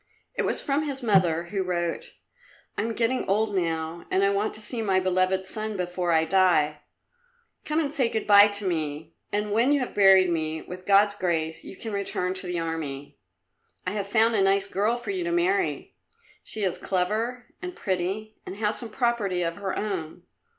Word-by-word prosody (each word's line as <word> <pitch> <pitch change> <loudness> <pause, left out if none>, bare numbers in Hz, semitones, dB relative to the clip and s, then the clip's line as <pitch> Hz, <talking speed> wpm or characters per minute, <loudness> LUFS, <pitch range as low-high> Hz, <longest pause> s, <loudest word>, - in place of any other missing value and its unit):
It - - -1
was - - +1
from 280 +1 +1
his 275 -3 -3
mother, 180 -7 +3
who 200 -2 -1
wrote, 180 - -2 0.6
"I - - -1
am 225 +1 -2
getting 240 +2 +1
old 210 +2 +1
now, 165 -1 -2
and 190 - +2
I 200 - +4
want 200 +2 -1
to - - -10
see 225 +2 -4
my 195 -3 +2
beloved 185 0 +1
son 215 +1 -4
before 180 -1 -1
I 160 -1 +3
die. 160 -4 +3 0.9
Come 305 +1 0
and 295 -3 -1
say 260 -6 +2
good 220 - -2
bye 205 0 +8
to 205 0 -5
me, 155 -2 -3 0.2
and 210 0 -1
when 235 +6 +3
you 290 - +3
have 250 - -4
buried 190 -2 +6
me, 160 -1 -2
with 185 0 -10
God's 205 +1 +5
grace, 165 -5 -2
you 195 - -10
can 220 -2 -6
return 190 -2 -2
to 185 -1 -7
the 175 0 -2
Army. 150 -7 -5 0.7
I 185 - -1
have 200 -1 -3
found 225 +2 +3
a 210 - +3
nice 195 0 +3
girl 210 +5 0
for 245 - -4
you 370 -2 -2
to 345 - -2
marry; 370 +3 0 0.5
she 215 - -4
is 185 -3 -1
clever 220 +7 -2
and 360 -1 -6
pretty, 195 +4 -3
and 185 - -7
has 210 +1 0
some 235 - -7
property 215 -7 0
of 165 0 -3
her 195 -2 -3
own. 185 -7 -4
195 Hz, 195 wpm, -26 LUFS, 180-220 Hz, 0.9 s, bye